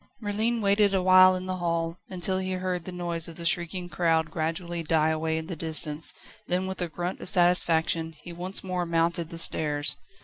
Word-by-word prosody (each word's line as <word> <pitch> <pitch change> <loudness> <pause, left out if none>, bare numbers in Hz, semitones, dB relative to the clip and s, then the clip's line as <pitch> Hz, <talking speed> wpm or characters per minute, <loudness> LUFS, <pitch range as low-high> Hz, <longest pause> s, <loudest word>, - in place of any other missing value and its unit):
Merlin 220 +2 -1
waited 200 0 +3
a 190 - +2
while 185 0 +7
in 185 0 -5
the 185 0 -3
hall, 170 -1 -2
until 185 0 0
he 190 0 -3
heard 185 -2 -3
the 185 - -6
noise 170 -2 -4
of 165 - -10
the 170 - -7
shrieking 175 +1 -1
crowd 165 -2 0
gradually 165 +1 -3
die 160 -1 +1
away 160 0 -1
in 160 - -4
the 175 +1 -6
distance, 155 -1 +1 0.4
then 180 +1 0
with 190 -1 -5
a 175 - 0
grunt 175 +3 -4
of - - 0
satisfaction 165 -2 +3
he 175 - -8
one 180 +3 -6
more 180 -2 -2
mounted 165 0 0
the 165 - -8
stairs. 150 -3 +1
175 Hz, 200 wpm, -26 LUFS, 165-185 Hz, 0.4 s, while